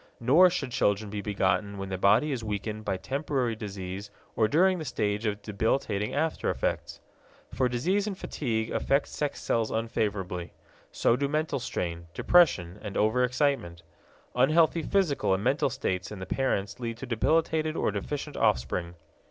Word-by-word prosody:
Nor 150 +10 +6
should 140 -7 -3
children 105 -4 +1
be 105 -1 -3
begotten 100 0 0
when 95 0 -5
the 95 - -2
body 105 +10 +4
is 125 -4 -3
weakened 105 0 -4
by 95 - -1
temporary 130 0 -1
disease 100 -2 -6 0.3
or 110 -1 +3
during 180 - +3
the - - -4
stage 105 -5 -1
of 105 -1 -3
debilitating 105 -1 -1
after 160 +2 0
effects. - - -2 0.5
For 130 -1 +1
disease 185 - 0
and 195 -3 -4
fatigue 115 -10 -2
affect 140 +1 +1
sex 145 -1 -3
cells 115 -1 +1
unfavorably. 100 -6 -2 0.4
So 115 - +2
do 140 +2 0
mental 150 -1 -1
strain, 85 -8 -4
depression 105 - +3
and 105 -3 -6
overexcitement. 125 - +1 0.5
Unhealthy 155 +6 +4
physical 155 - +1
and 95 - -4
mental 135 +3 +2
states 95 -9 -3
in 105 - -6
the 95 - -6
parents 100 -3 -1
lead 115 -2 -4
to 135 - -6
debilitated 155 +6 +1
or - - +1
deficient 145 +8 -4
offspring. 85 - 0
115 Hz, 155 wpm, -28 LUFS, 100-140 Hz, 0.5 s, Nor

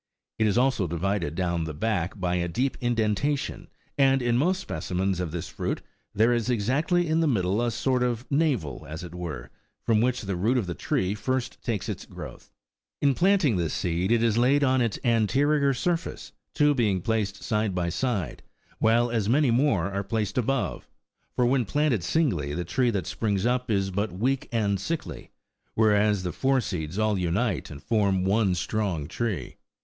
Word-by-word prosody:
It 110 - +3
is 105 - +1
also 125 -7 +2
divided 85 -1 -1
down 85 -2 -1
the 80 -2 -5
back 100 +1 -1
by 90 -1 0
a 85 0 -1
deep 125 +10 -1
indentation, 120 +4 -1 0.3
and 135 -1 +5
in 120 -1 +2
most 180 +9 +2
specimens 90 - -2
of 90 -2 -2
this 85 +1 -5
fruit - - -4 0.3
there 115 +4 +4
is 120 0 0
exactly 140 - +1
in 160 +1 +2
the 165 - +2
middle 100 -4 +1
a 120 - +1
sort 125 +3 0
of 120 -1 -1
navel, 140 - 0
as 80 +3 -6
it 85 -1 -8
were, 80 -9 -6 0.3
from 110 -2 +3
which 125 +1 +1
the 100 -2 -2
root 110 +9 +1
of 115 - 0
the 90 - -3
tree 95 +3 -1
first 130 +4 -3
takes 110 -5 -2
its - - -5
growth.16 - - -10 0.6
In - - +3
planting 175 - +3
this 85 -4 -1
seed 90 +2 -1
it 115 -1 +3
is 115 -1 +2
laid 140 +4 +4
on 130 -1 +3
its 115 -4 0
anterior 140 +5 +2
surface, 165 +6 -2 0.2
two 150 -1 +4
being 105 -8 +1
placed 105 -1 -1
side 105 -3 0
by 85 -1 0
side, 100 - -2 0.4
while 115 +2 +3
as 110 -3 0
many 135 0 +3
more 115 - +2
are 100 0 -2
placed 105 0 -2
above; 125 +1 -1 0.5
for 125 - +2
when 125 +1 +3
planted 135 - 0
singly, 90 - 0
the 90 +1 -3
tree 125 +7 +1
that 100 -7 -1
springs 100 +1 -1
up 125 +1 0
is 95 -2 +1
but 100 +2 -1
weak 125 +9 -1
and 105 -4 +1
sickly, 100 - -5 0.5
whereas 105 -2 +3
the 90 - -2
four 135 +5 +1
seeds 90 -6 -4
all 110 -2 +1
unite 90 +3 -1
and 75 0 -10
form 100 -5 +1
one 95 -1 +2
strong 90 -5 -2
tree. 95 - -3
110 Hz, 185 wpm, -26 LUFS, 90-125 Hz, 0.6 s, and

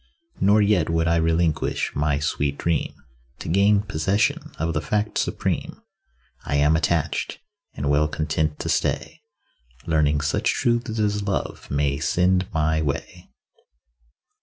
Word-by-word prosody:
Nor 105 +2 +4
yet 100 -6 +2
would 80 0 +1
I 85 0 +3
relinquish 80 -1 0
my 75 0 +1
sweet 70 -1 -1
dream 85 -3 0 0.5
To - - -8
gain 100 +4 +3
possession 95 +2 0
of 80 +1 -1
the 75 - -1
Fact 105 +7 -1
supreme. - - -2 0.6
I 70 - -2
am 75 +2 +4
attached, 80 -1 0 0.4
and 70 - -3
well 75 +1 +3
content 75 0 -1
to - - -4
stay, 160 - -1 0.6
Learning 75 -2 +2
such 75 0 0
truths 120 -1 0
as 105 -1 0
love 100 -1 -3
may 70 -1 0
send 90 +3 +1
my 80 0 +1
way. 70 -2 -4
80 Hz, 135 wpm, -23 LUFS, 75-100 Hz, 0.6 s, Nor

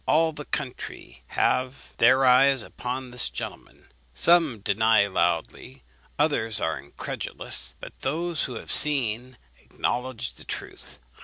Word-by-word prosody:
All 160 +1 +3
the 150 -1 -8
country 135 -4 -6
have 130 +1 -1
their 130 +3 +5
eyes 130 0 +5
upon 125 +2 -6
this 125 -1 +2
gentleman; - - -9 0.2
some 165 -9 +4
deny 110 +1 +3
loudly, 85 -8 -2 0.3
others 115 -8 +1
are 80 -4 -1
incredulous; 70 -2 -4
but - - -10
those 165 +3 -2
who 125 - -6
have - - -6
seen 130 -4 +2 0.2
acknowledge 125 -1 -3
the - - -10
truth. - - -8
125 Hz, 125 wpm, -25 LUFS, 110-140 Hz, 0.3 s, their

